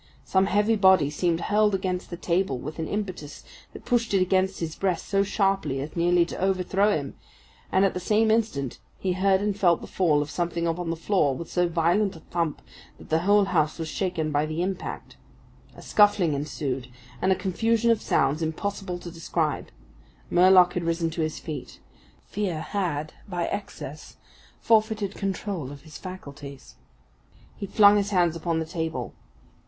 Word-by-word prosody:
Some 190 0 +2
heavy 210 +3 +2
body 190 -8 +5
seemed 170 +2 0
hurled 210 -1 +2
against 185 -1 -3
the 175 - -6
table 175 -5 0
with 150 +6 -7
an 160 - -2
impetus 185 -8 -5 0.3
that - - -12
pushed 235 -4 +1
it - - +4
against 190 +1 +1
his 160 -2 -3
breast 185 -4 -1
so 195 0 +2
sharply 195 -8 0
as 145 +3 -6
nearly 175 0 +3
to - - -7
overthrow 190 +2 +2
him, 140 -2 -6 0.6
and 190 +1 +4
at 195 - +1
the 180 - -3
same 215 +4 +2
instant 215 - -1 0.2
he 185 -1 -1
heard 190 +1 +2
and 205 -1 0
felt 180 -5 +3
the - - -9
fall 155 -6 +2
of 150 - -9
something 170 +2 -2
upon 170 +1 -2
the 165 - -1
floor 165 -5 +1
with 165 +5 -7
so 180 -1 +2
violent 175 +5 +1
a - - -10
thump 165 -3 -3 0.3
that - - -15
the 160 - +2
whole 200 +3 +4
house 155 -5 +1
was 160 -2 -4
shaken 170 -5 -2
by 150 +1 +1
the 155 +3 -2
impact. 190 +1 -5 0.6
A - - -12
scuffling 205 -6 +4
ensued, 140 -3 -3 0.3
and 190 - +2
a - - +4
confusion 225 +5 +1
of 225 - +1
sounds 140 +4 +1
impossible 180 +3 -3
to 175 0 -9
describe. 165 -2 -2 0.6
Murlock 180 0 +6
had 175 - -2
risen 165 0 0
to 165 - -3
his 155 0 -2
feet. 145 -6 -7 0.5
Fear 185 -6 -3
had 160 -6 -3 0.2
by 175 -2 -1
excess 200 -7 -7 0.4
forfeited 215 -3 +2
control 195 -8 -3
of 140 -1 -10
his 155 -2 -11
faculties. 145 -7 -10 0.8
He 200 - -6
flung 205 +1 +6
his 200 0 0
hands 175 -4 +2
upon 165 0 -1
the 160 - -1
table. 160 0 -4
180 Hz, 175 wpm, -26 LUFS, 160-195 Hz, 0.8 s, Murlock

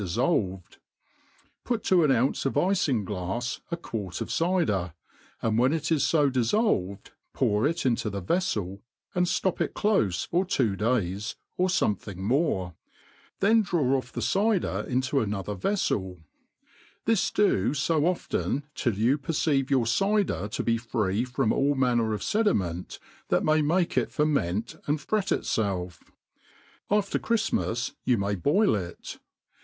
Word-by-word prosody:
4ifii|)yc^|.pu4:^> 125 - -2
^n 135 - +4
ounce 125 +4 +1
of - - -2
ifin 145 - +1
glafs 105 +6 -3
a 170 - -2
quart 100 - -5
of - - -4
cyder, 115 - 0 0.5
and 115 0 +1
when 130 +3 +4
it 160 0 -2
is 155 -3 +2
fo 150 -3 +3
diflfolved,^ 125 - 0 0.2
pour 105 +6 +2
it 165 0 -2
into 115 -3 +1
the 100 -1 -4
veflel, 100 - -1 0.3
and 180 0 +1
ftop 185 +1 0
it - - -1
clofe 110 - +1
for 175 +2 +1
two 130 - 0
days, 105 -1 -1 0.2
or 185 - +2
fomething 105 - -1
more; 100 - 0 0.7
then 220 +3 +5
draw, 155 -9 +1
off 130 -1 -3
the - - -4
cyder 205 -1 +1
into 130 +2 0
anothjcr 105 -4 -2
veflbl: 95 - -1 0.8
t^i» 225 -4 +1
do 170 - +2
fo 150 +1 +1
often 170 -4 -1
till 120 -6 -1
you 120 +8 +2
perceive 140 -2 0
your 130 -4 +2
c^der 190 - +1
to - - -3
be 115 0 +1
free 110 -2 -1
from 125 -3 0
aU 140 +1 +2
manner 120 -4 +2
of 105 - -3
fedi, 210 -1 +2
* - - +4
ment, 90 -2 -4 0.3
that - - +1
may 155 0 +3
m^ke 170 +4 +1
it - - +1
ferment 120 - 0
and 150 +1 +1
fret 200 +7 -1
itfelf: 90 -5 -1 0.9
after 205 -1 +1
Chrift*' 230 -1 0
mas 120 +2 -1
you 125 -2 +2
may 100 0 -1
boil 150 - +2
it. 90 -4 -5
130 Hz, 150 wpm, -27 LUFS, 100-170 Hz, 0.9 s, then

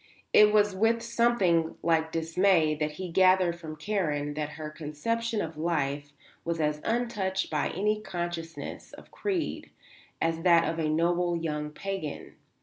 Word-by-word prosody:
It 210 0 +7
was 210 -2 +3
with 225 +3 +2
something 230 -9 +2
like 160 -1 +2
dismay 165 0 +2
that 150 0 -2
he 180 +2 -6
gathered 185 -1 +4
from 155 -2 -7
Karen 150 -5 -1
that 150 0 -4
her 155 -1 -6
conception 210 +10 -2
of 160 -1 -7
life 145 -3 -1 0.3
was 170 0 -2
as 150 -1 0
untouched 210 -5 -1
by 150 -2 0
any 210 +3 0
consciousness 175 -4 -6
of - - -14
creed 380 -5 -3 0.5
as 165 0 0
that 170 -1 +5
of 165 0 -2
a 155 -1 0
noble 175 +2 +1
young 150 -2 -3
pagan. 190 0 -5
170 Hz, 145 wpm, -28 LUFS, 155-195 Hz, 0.5 s, It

